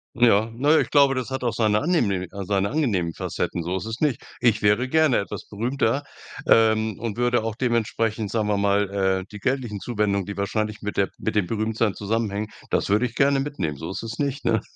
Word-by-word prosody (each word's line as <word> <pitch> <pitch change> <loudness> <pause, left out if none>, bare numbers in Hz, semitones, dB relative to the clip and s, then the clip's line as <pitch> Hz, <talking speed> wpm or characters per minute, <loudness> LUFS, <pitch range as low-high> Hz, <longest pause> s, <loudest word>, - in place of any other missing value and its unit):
Ja, 115 -2 +4
ne, 145 +6 +4
ich - - -3
glaube, 140 -2 +5
das 130 -1 -3
hat 130 -1 -4
auch 120 -2 0
seine 105 -2 +2
angenehm 100 - +1
seine 100 0 -1
angenehmen 100 - 0
Facetten, 85 - -3
so 90 +3 -2
ist 95 - -5
es 110 +1 -5
nicht. 145 -6 +1 0.2
Ich 115 -4 +2
wäre 110 +5 +3
gerne 155 -4 +4
etwas 100 - -6
berühmter, 120 +5 -1 0.4
ähm, 110 -2 +4
und 115 -2 -4
würde 120 -2 +2
auch 115 -1 -3
dementsprechend, 115 -3 -1
sagen 110 -2 0
wir 105 -1 +1
mal, 100 0 +2
äh: 95 -1 0
„Die 105 - -7
geldlichen 120 -3 -2
Zuwendungen, 105 -4 -1
die 100 0 -6
wahrscheinlich 105 +2 -2
mit 105 0 -5
der 100 - +2
mit 110 - -2
dem 105 -4 +2
Berühmtseien 110 0 0
zusammenhängen“, 105 0 -2 0.2
das - - 0
würd 105 +4 +3
ich 120 -2 -1
gerne 140 +1 +3
mitnehmen, 95 - -3
so 80 +5 -6
ist - - -4
es 115 0 -6
nicht, 140 -1 -2
ne? 110 -3 +2
110 Hz, 205 wpm, -24 LUFS, 100-120 Hz, 0.4 s, glaube